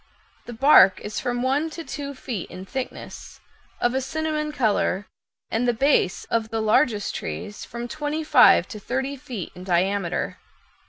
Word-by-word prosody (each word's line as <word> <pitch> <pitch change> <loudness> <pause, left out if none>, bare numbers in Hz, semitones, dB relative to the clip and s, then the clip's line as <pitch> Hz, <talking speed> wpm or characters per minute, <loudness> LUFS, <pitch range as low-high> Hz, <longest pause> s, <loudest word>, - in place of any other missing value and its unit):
The 240 - -6
bark 230 -6 +6
is 210 - -4
from 245 0 -2
one 280 +5 +1
to 330 +1 -7
two 280 -3 -6
feet 240 -7 -5
in 185 - -9
thickness, 265 +5 -7 0.4
of 240 - +1
a 265 - 0
cinnamon 305 +1 -2
color, 210 -6 0 0.5
and 240 +2 0
the 240 - +2
base 270 -7 +2
of 225 -1 0
the 225 +1 -2
largest 220 -1 +2
trees 80 - -6
from 235 +1 -6
twenty 305 +3 -3
five 305 - +6
to 215 - -7
thirty 265 +6 -2
feet 240 -8 -7
in 180 - -10
diameter. 185 0 0
240 Hz, 160 wpm, -24 LUFS, 205-280 Hz, 0.5 s, bark